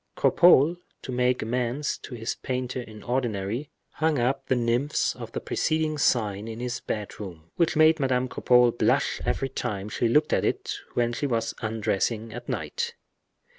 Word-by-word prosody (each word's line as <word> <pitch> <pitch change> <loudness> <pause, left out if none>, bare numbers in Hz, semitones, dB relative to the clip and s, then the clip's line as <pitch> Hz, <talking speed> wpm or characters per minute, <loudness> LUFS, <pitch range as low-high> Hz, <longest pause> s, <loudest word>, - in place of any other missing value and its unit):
Cropole, 170 -2 +5 0.3
to - - -5
make 125 -1 +1
amends 125 +5 -1
to 125 - -8
his 115 0 -3
painter 125 0 -3
in 110 -3 -11
ordinary, 120 +1 -2 0.2
hung 160 -1 +1
up 135 +2 0
the 130 - +2
nymphs 120 +4 +1
of - - -8
the - - -2
preceding 155 -1 0
sign 105 -5 +1
in 115 0 -6
his 125 0 -3
bedroom, 95 -6 -6
which 170 - +2
made 155 +1 +5
Madame 130 -2 +1
Cropole 125 -1 +4
blush - - +1
every 135 - 0
time 105 -6 -3
she 115 - 0
looked 150 +6 +3
at - - +2
it, - - -1 0.2
when 120 0 +1
she 145 +4 -1
was 115 -3 -1
undressing 110 0 -1
at 120 +1 -8
night. 470 0 -3
125 Hz, 165 wpm, -26 LUFS, 115-135 Hz, 0.3 s, Cropole